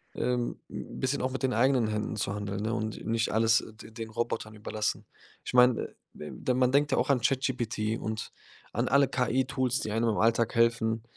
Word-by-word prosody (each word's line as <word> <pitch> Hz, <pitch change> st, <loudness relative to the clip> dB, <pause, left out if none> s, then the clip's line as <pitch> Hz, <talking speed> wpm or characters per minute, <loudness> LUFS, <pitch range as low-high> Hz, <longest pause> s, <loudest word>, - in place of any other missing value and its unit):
ähm, 125 Hz, -1 st, -1 dB
'n -, -, -7 dB
bisschen 130 Hz, +2 st, 0 dB
auch 130 Hz, -, -1 dB
mit 135 Hz, +1 st, -5 dB
den 130 Hz, -, +2 dB
eigenen 125 Hz, 0 st, +3 dB
Händen 105 Hz, 0 st, -2 dB
zu 100 Hz, -, -1 dB
handeln, 100 Hz, -1 st, -4 dB
ne, 115 Hz, +1 st, -1 dB
und 110 Hz, -1 st, -4 dB
nicht 115 Hz, 0 st, 0 dB
alles 115 Hz, +1 st, +4 dB
d 110 Hz, 0 st, -13 dB
den 110 Hz, 0 st, -7 dB
Robotern 110 Hz, -1 st, -3 dB
überlassen. 105 Hz, 0 st, -3 dB, 0.4 s
Ich -, -, -5 dB
meine, 125 Hz, -1 st, +4 dB, 0.3 s
äh, 75 Hz, -, -7 dB, 0.2 s
ja, 125 Hz, -, +4 dB
man 125 Hz, 0 st, +3 dB
denkt 145 Hz, +1 st, +3 dB
ja -, -, +2 dB
auch -, -, 0 dB
an 135 Hz, -, +4 dB
ChatGPT 120 Hz, -4 st, 0 dB
und 110 Hz, 0 st, -4 dB, 0.4 s
an -, -, 0 dB
alle 140 Hz, 0 st, +5 dB
KI-Tools, 130 Hz, 0 st, 0 dB
die 105 Hz, -, -3 dB
einem 115 Hz, +2 st, +1 dB
im 105 Hz, -, 0 dB
Alltag 115 Hz, +1 st, +2 dB
helfen. 115 Hz, -1 st, +2 dB
115 Hz, 200 wpm, -29 LUFS, 110-125 Hz, 0.4 s, alle